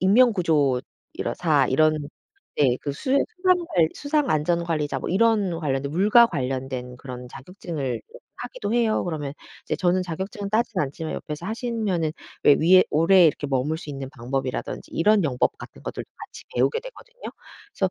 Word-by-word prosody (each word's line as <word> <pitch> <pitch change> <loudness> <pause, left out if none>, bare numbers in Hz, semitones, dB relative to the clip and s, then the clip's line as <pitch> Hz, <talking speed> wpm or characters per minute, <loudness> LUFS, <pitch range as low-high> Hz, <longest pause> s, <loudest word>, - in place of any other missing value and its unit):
인명구조사 165 - +2
이런 155 +4 +4 0.6
네. 130 -4 +3
그 145 - -3
수영 265 - 0
수상 365 0 +2 0.4
수상안전관리자 170 - 0
뭐 - - -4
이런 200 -3 +2
관련된 140 -3 -2
물과 210 +8 +5
관련된 130 - -4
그런 125 -2 -8
자격증을 150 -2 -5 0.4
하기도 - - -5
해요. 230 -2 +2
그러면 150 -5 -4 0.3
이제 - - -2
저는 185 0 +1
자격증을 195 +4 -5
따진 220 -2 0
않지만 150 +3 -3
옆에서 150 +4 -6
하시면은 215 -8 -1 0.3
왜 145 - +8
위에 185 +3 +6
오래 170 +4 +5
이렇게 145 -1 0
머물 135 +4 0
수 150 - -8
있는 135 -2 -6
방법이라든지 130 +2 -4
이런 205 +2 +3
영법 125 -4 0
같은 - - -12
것들 - - -5
같이 - - -11
배우게 465 - +2
되거든요. - - -14 0.5
그래서 190 -2 0
165 Hz, 350 characters per minute, -24 LUFS, 140-210 Hz, 0.6 s, 왜